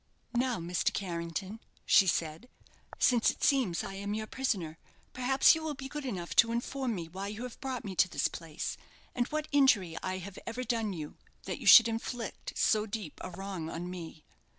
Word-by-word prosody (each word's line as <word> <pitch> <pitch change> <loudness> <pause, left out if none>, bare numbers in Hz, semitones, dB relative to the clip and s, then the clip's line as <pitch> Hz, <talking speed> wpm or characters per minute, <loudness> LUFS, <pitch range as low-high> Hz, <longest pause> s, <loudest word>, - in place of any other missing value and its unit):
"Now, 245 -1 +1
Mr. 170 +1 0
Carrington," 185 +3 -4 0.3
she 195 - +6
said, 165 +7 -1 0.5
"since 240 -3 +4
it - - -4
seems 255 - +2
I - - -6
am 200 +1 -3
your 215 0 -3
prisoner, 195 -11 -2 0.3
perhaps 265 +2 +5
you 320 - -2
will 315 -2 -3
be 270 0 -7
good 295 +1 -6
enough 180 -9 -4
to 230 - +6
inform 245 +1 -2
me 170 -3 -5
why 190 +4 -6
you 210 +3 -6
have 250 +2 -8
brought 260 -4 -4
me 195 - -4
to 185 - +4
this - - +1
place, 160 -3 -5 0.4
and 245 0 0
what 310 0 -3
injury 230 - +4
I 185 0 -2
have 190 +1 -8
ever 235 +2 -3
done 225 -3 -1
you 155 -4 -7 0.3
that - - -4
you - - -5
should 230 -1 +10
inflict 230 +1 -4
so 215 -1 +3
deep 200 -7 -6
a - - -4
wrong 185 -3 -5
on 175 +2 -5
me?" 165 -3 -8
210 Hz, 195 wpm, -31 LUFS, 180-250 Hz, 0.5 s, should